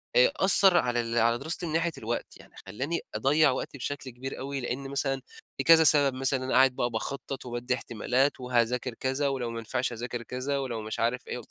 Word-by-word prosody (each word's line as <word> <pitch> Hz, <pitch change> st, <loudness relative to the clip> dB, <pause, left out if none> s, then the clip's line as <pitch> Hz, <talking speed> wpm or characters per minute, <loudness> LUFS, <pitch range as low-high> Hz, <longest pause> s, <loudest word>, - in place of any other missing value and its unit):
آآ -, -, +6 dB
أثّر 190 Hz, -1 st, +5 dB
على 120 Hz, -4 st, +1 dB
ال 115 Hz, 0 st, -3 dB
على 115 Hz, +1 st, +3 dB
دراستي 160 Hz, +6 st, -3 dB
من 160 Hz, -, -4 dB
ناحية 165 Hz, +1 st, +1 dB
الوقت. 115 Hz, +2 st, -4 dB
يعني -, -, -18 dB
خلّاني 135 Hz, -, -3 dB
أضَّيع 140 Hz, +8 st, +3 dB
وقتي 130 Hz, +2 st, -4 dB
بشكل 135 Hz, 0 st, -5 dB
كبير 125 Hz, +2 st, -7 dB
أوي، 140 Hz, +1 st, -4 dB
لأن 135 Hz, +2 st, -4 dB
مثلًا 135 Hz, -1 st, -1 dB, 0.4 s
في 135 Hz, -, -1 dB
كذا 165 Hz, +2 st, +7 dB
سبب، 145 Hz, -3 st, +5 dB
مثلًا 130 Hz, 0 st, 0 dB
أنا 130 Hz, -, -2 dB
قاعد 130 Hz, 0 st, +5 dB
بقى 120 Hz, -, 0 dB
باخطط، 135 Hz, +3 st, -5 dB
وبادي 120 Hz, +1 st, -2 dB
احتمالات، 125 Hz, +4 st, 0 dB
وهاذاكر 125 Hz, 0 st, 0 dB
كذا، 135 Hz, +4 st, -1 dB
ولو 130 Hz, -3 st, -2 dB
ما 115 Hz, -, -5 dB
نفعش 125 Hz, +3 st, -2 dB
أذاكر 120 Hz, +1 st, -5 dB
كذا، 130 Hz, +4 st, -3 dB
ولو 120 Hz, -5 st, -3 dB
مش 110 Hz, 0 st, -5 dB
عارف 120 Hz, +2 st, -1 dB
إيه، 125 Hz, -, -5 dB
130 Hz, 205 wpm, -28 LUFS, 120-140 Hz, 0.4 s, كذا